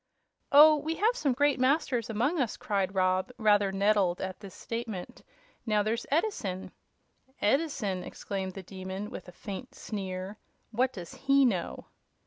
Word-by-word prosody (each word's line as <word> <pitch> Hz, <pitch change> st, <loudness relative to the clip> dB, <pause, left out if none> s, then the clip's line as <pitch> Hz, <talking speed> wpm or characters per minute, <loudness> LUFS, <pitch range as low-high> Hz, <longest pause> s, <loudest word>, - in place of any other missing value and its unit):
"Oh, 300 Hz, +2 st, +9 dB
we 310 Hz, +3 st, -2 dB
have 445 Hz, +7 st, +2 dB
some 285 Hz, -, +1 dB
great 285 Hz, +1 st, +2 dB
masters 255 Hz, -4 st, +1 dB
among 245 Hz, +10 st, 0 dB
us!" 240 Hz, -, -1 dB
cried 195 Hz, -2 st, -1 dB
Rob, 185 Hz, +4 st, +1 dB
rather 205 Hz, -3 st, +3 dB
nettled 195 Hz, -2 st, +2 dB
at 190 Hz, -1 st, -5 dB
this 200 Hz, -3 st, -11 dB
statement. 225 Hz, -6 st, -6 dB, 0.4 s
"Now, 210 Hz, -2 st, +2 dB
there's 225 Hz, +3 st, -2 dB
Edison 275 Hz, -, -1 dB, 0.3 s
" -, -, -44 dB, 0.3 s
"Edison!" 210 Hz, -, 0 dB
exclaimed 190 Hz, -2 st, -5 dB
the 195 Hz, -, -7 dB
Demon, 190 Hz, +3 st, -6 dB
with 190 Hz, -, -8 dB
a -, -, -9 dB
faint 200 Hz, +7 st, -8 dB
sneer; 190 Hz, -1 st, -5 dB, 0.3 s
"what 250 Hz, +3 st, +1 dB
does 175 Hz, -7 st, -8 dB
he 275 Hz, 0 st, +3 dB
know?" 190 Hz, -8 st, -1 dB
210 Hz, 150 wpm, -29 LUFS, 190-270 Hz, 0.4 s, Oh